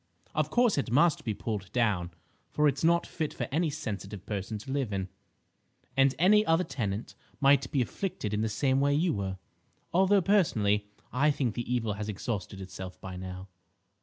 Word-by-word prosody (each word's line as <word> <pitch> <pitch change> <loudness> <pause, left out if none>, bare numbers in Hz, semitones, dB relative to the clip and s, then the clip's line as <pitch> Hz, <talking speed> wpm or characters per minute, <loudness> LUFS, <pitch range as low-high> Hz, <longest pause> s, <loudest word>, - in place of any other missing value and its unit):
Of - - 0
course 240 -9 +3
it 135 - -2
must 150 +6 +3
be 110 -3 -2
pulled 100 -3 -4
down, 105 -8 +1 0.4
for 150 0 +2
it's 140 0 0
not 170 +1 +4
fit 155 -3 -4
for - - -3
any 160 +3 +1
sensitive 105 - -5
person 105 +1 -3
to 135 +6 -8
live 135 -5 -1
in, 95 -1 -2 0.9
and 135 0 +4
any 210 +6 +5
other 165 -1 +3
tenant 105 - -3 0.3
might 140 -2 +4
be 135 -3 +2
afflicted 120 - -4
in 105 - 0
the 110 - 0
same 130 +5 +1
way 140 0 +3
you 165 +3 +2
were. 95 -2 -3 0.6
Although, 190 +2 +4
personally, 105 - +2 0.3
I 140 +5 +3
think 135 -6 0
the 120 +1 -4
evil 115 -4 0
has 105 +1 -5
exhausted 100 -1 -4
itself 95 0 -8
by 95 -1 -7
now." 95 +1 -7
125 Hz, 180 wpm, -29 LUFS, 105-150 Hz, 0.9 s, any